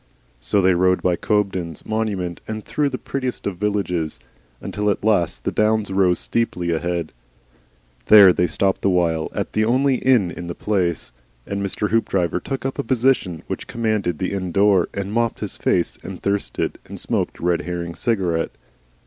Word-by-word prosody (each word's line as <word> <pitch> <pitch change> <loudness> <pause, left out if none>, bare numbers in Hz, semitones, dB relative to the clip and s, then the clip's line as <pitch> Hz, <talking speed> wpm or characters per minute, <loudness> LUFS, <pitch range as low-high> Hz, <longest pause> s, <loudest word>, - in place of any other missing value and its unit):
So 95 +11 +1
they 95 0 +5
rode 90 +1 +2
by 90 -1 +3
Cobden's 95 -6 -1
monument 100 -6 -2
and 110 -1 -5
through 145 -1 0
the 130 - -4
prettiest 130 -2 -4
of 100 -3 -3
villages, 90 -8 -1 0.4
until 105 0 -2
at 100 - -1
last 100 -6 +1
the - - -1
downs 110 -1 +1
rose 95 -2 +3
steeply 90 -7 -1
ahead. 85 0 -2 1.0
There 100 -4 +9
they 90 - +1
stopped 95 +3 0
awhile 85 -4 +1
at - - -3
the 110 - +2
only 130 +4 +2
inn 120 -10 +3
in 85 +1 -7
the 85 - -5
place, 90 -9 -1 0.3
and 100 0 -3
Mr. 100 +1 -2
Hoopdriver 95 -6 +1
took 135 +7 -5
up 135 +1 -3
a - - +1
position 125 - +1
which - - -5
commanded 110 -7 -1
the 95 - -2
inn 95 -2 -3
door, 100 -1 +3
and 100 +1 -4
mopped 115 0 0
his 105 - -5
face 85 - 0
and - - -8
thirsted 100 0 -2
and - - -7
smoked - - -2
a - - -9
Red 85 -1 +2
Herring 85 +1 -4
cigarette. 90 -7 -1
100 Hz, 175 wpm, -21 LUFS, 90-110 Hz, 1.0 s, There